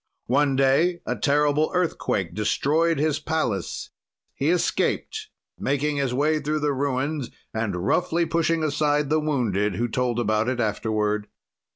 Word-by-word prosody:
"One 140 +2 +2
day, 140 +7 +3
a - - -1
terrible 150 +1 +2
earthquake 130 - 0
destroyed 155 +10 +1
his 155 +1 +1
palace; 140 - -2 0.4
he 140 - 0
escaped, 430 - 0 0.3
making 145 +2 0
his 135 -3 0
way 150 +4 +1
through 150 +1 -1
the 145 -1 +1
ruins 140 +1 -1 0.2
and 100 -5 -2
roughly 170 - +1
pushing 165 0 +1
aside 150 -1 +1
the 155 - +4
wounded 110 -10 0
who 120 +4 0
told 120 0 -1
about 110 0 +1
it 130 -1 -2
afterward. 105 -1 0
140 Hz, 140 wpm, -24 LUFS, 120-155 Hz, 0.4 s, the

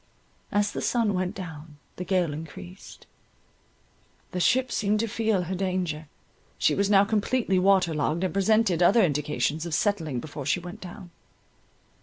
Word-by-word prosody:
As 205 0 +1
the - - -4
sun 230 -4 +1
went 185 -1 -2
down, 160 -5 -9 0.2
the 180 - -4
gale 180 -5 0
encreased; 140 - -10 1.3
the 180 - -3
ship 255 +8 +2
seemed 210 0 +1
to 230 - -1
feel 220 -3 0
her 180 +2 -4
danger, 180 -5 -2 0.5
she - - +3
was 200 0 +1
now 200 -1 +6
completely 215 -1 +1
water 185 -3 +3
logged, 155 +3 -1
and 185 - -1
presented 195 -2 +2
other 210 +6 +5
indications 150 -1 0
of 170 -3 -2
settling 165 - 0
before 145 0 -7
she 180 - +2
went 180 +5 -9
down. 175 -1 -10
180 Hz, 155 wpm, -26 LUFS, 160-205 Hz, 1.3 s, now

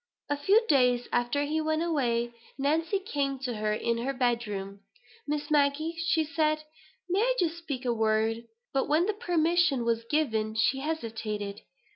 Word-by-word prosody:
A - - +3
few 395 +11 +3
days 250 - +3
after 245 +4 +1
he 310 +2 0
went 315 +1 0
away, 240 -8 0 0.2
Nancy 320 +7 +1
came 280 -8 -2
to 245 -4 -3
her 215 0 0
in 230 +2 0
her 265 +4 -1
bed 240 -3 0
room. 195 -1 -5 0.5
"Miss 295 +1 -2
Maggie," 295 +3 +2 0.4
said 310 -1 +2
she, 305 - -15 0.4
"may 370 +2 +1
I - - +2
just 340 -1 0
speak 280 -6 -5
a 240 - +2
word?" 220 +1 +1 0.3
But 270 - +1
when 315 +4 +3
the 425 - 0
permission 345 - +2
was 230 0 +1
given, 220 -8 0
she 245 +4 +2
hesitated. 225 -9 -4
275 Hz, 165 wpm, -28 LUFS, 230-315 Hz, 0.5 s, A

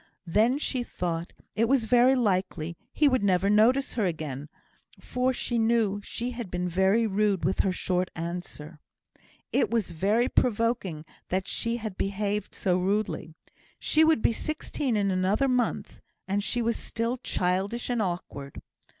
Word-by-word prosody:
Then 220 +9 +3
she 265 -3 -1
thought 170 -7 -3 0.2
it 230 +1 +2
was 265 -4 +3
very 245 +3 +5
likely 185 -8 0 0.2
he 300 - +3
never 200 -9 +2
would 200 - +3
notice 245 +6 +4
her 215 -5 +1
again, 150 -4 -4 0.5
for 250 +1 0
she 240 -2 -1
knew 225 -3 +2
she 240 +4 -4
had 240 -5 -6
been 180 0 -2
very 190 +6 +3
rude 205 -2 +1
with - - 0
her 190 - +3
short 180 0 -1
answers; 165 -2 -6 0.7
it - - +2
was 225 -6 0
very 205 +9 +2
provoking 220 -9 0 0.2
that 185 +1 -1
she 230 0 -2
had 215 -5 -6
behaved 200 +1 -2
so 185 -2 +1
rudely. 190 -4 -1 0.4
She 315 - +2
should 320 -7 +4
be - - +4
sixteen 285 -3 -2
in 200 -1 +1
another 190 +8 +2
month, 250 -2 -1 0.3
and 200 +1 0
she 240 +3 0
was 230 0 0
still 230 +2 -2
childish 195 +3 -1
and 245 -2 0
awkward. 175 -7 -4
210 Hz, 155 wpm, -27 LUFS, 180-235 Hz, 0.7 s, very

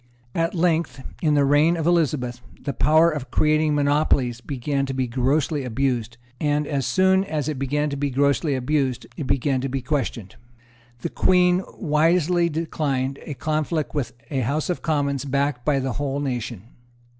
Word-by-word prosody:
At 165 +2 0
length, 165 -5 0 0.2
in 150 -3 +2
the 140 -1 +4
reign 150 +5 +4
of 160 - -2
Elizabeth, 145 -8 +1 0.2
the 140 - -4
power 160 +2 +4
of 145 -4 -5
creating 155 0 +2
monopolies 140 -4 +1
began 140 +1 -2
to 135 - -4
be 130 -1 0
grossly 135 +4 0
abused; 120 -2 -1 0.2
and, 150 0 +1
as 140 -3 -1
soon 190 +8 +3
as 155 -7 -3
it 150 -4 -3
began 145 +2 0
to - - -2
be 140 0 -1
grossly 140 +2 +1
abused, 130 -1 -1
it 150 -6 -5
began 135 0 +1
to 135 - -2
be 135 -1 -3
questioned. 125 -8 -3 0.6
The - - -2
Queen 180 0 +3 0.2
wisely 170 +1 +2
declined 145 -4 -2
a 145 - -4
conflict 155 +2 -1
with 145 -6 -2 0.2
a 135 - 0
House 145 +8 -1
of 175 - -4
Commons 140 -4 0
backed 140 -2 -1
by 150 -2 +2
the 130 -2 -1
whole 140 +1 -2
nation. 120 -7 -3
145 Hz, 170 wpm, -23 LUFS, 130-155 Hz, 0.6 s, the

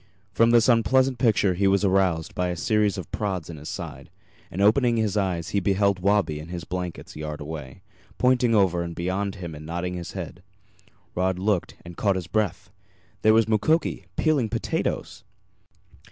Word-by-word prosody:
From 115 +3 +4
this 115 -1 +5
unpleasant 130 +2 +3
picture 105 -5 +3
he 100 +3 +1
was 100 +1 +3
aroused 95 -4 +1
by 90 - -1
a 90 - -2
series 105 +3 +1
of 95 - -7
prods 95 -6 -3
in 80 - -9
his 75 +1 -8
side, - - -7 0.4
and 90 - -7
opening 115 +4 +4
his 110 -3 0
eyes 90 -5 -1
he 100 - +1
beheld 100 0 +1
Wabi 95 -5 +1
in 75 - -8
his 85 -1 -6
blankets 90 0 -6
a - - -8
yard 75 -1 -5
away, 75 +1 -8 0.3
pointing 125 -2 +3
over 95 -4 +3
and 85 -1 -5
beyond 95 +3 -2
him 85 -4 -7
and 75 0 -9
nodding 85 +3 -3
his 85 -1 -6
head. 90 -2 -7 0.7
Rod 95 0 0
looked, 95 -1 -1
and 85 0 -10
caught 100 -2 +2
his 90 -2 -3
breath. 95 0 -2 0.5
There 110 0 +5
was 115 0 +4
Mukoki 115 +10 +1
peeling 145 -8 +1
potatoes! - - -3
95 Hz, 180 wpm, -25 LUFS, 85-110 Hz, 0.7 s, this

